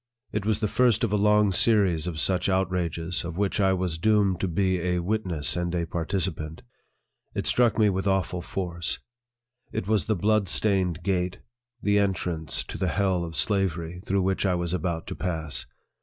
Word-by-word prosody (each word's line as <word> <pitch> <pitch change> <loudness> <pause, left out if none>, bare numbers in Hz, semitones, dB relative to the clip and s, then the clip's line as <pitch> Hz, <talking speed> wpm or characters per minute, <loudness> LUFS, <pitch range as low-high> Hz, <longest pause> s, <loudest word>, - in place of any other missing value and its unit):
It 105 0 -2
was 110 -1 +1
the 105 - +2
first 115 +2 +2
of 110 -3 +1
a - - +4
long 105 0 +4
series 95 -5 +3
of 80 -3 -3
such 95 +2 +1
outrages, 90 -3 0
of 85 0 -6
which 100 +1 0
I 95 -1 +4
was 90 -3 -2
doomed 100 -1 +3
to 95 - 0
be 95 +1 +1
a 90 0 0
witness 90 -5 -1
and 90 0 -1
a 85 -1 0
participant. 80 -2 -3 0.7
It - - -2
struck 120 -3 +3
me 110 -2 +5
with 95 0 0
awful 95 -2 0
force. 85 -2 -3 0.7
It 95 - -3
was 110 -2 +2
the 110 - +2
blood 105 0 +2
stained 90 -6 +1
gate, 90 -1 0 0.5
the 105 0 +3
en 100 -1 +2
trance 80 -4 -2
to - - -7
the 95 - +1
hell 95 0 +1
of 80 -1 -6
slavery, 90 -4 0
through 95 0 0
which 95 0 0
I 95 -2 +2
was 85 0 -2
about 85 -2 -2
to - - -5
pass. 80 -4 -3
95 Hz, 185 wpm, -26 LUFS, 85-100 Hz, 0.7 s, me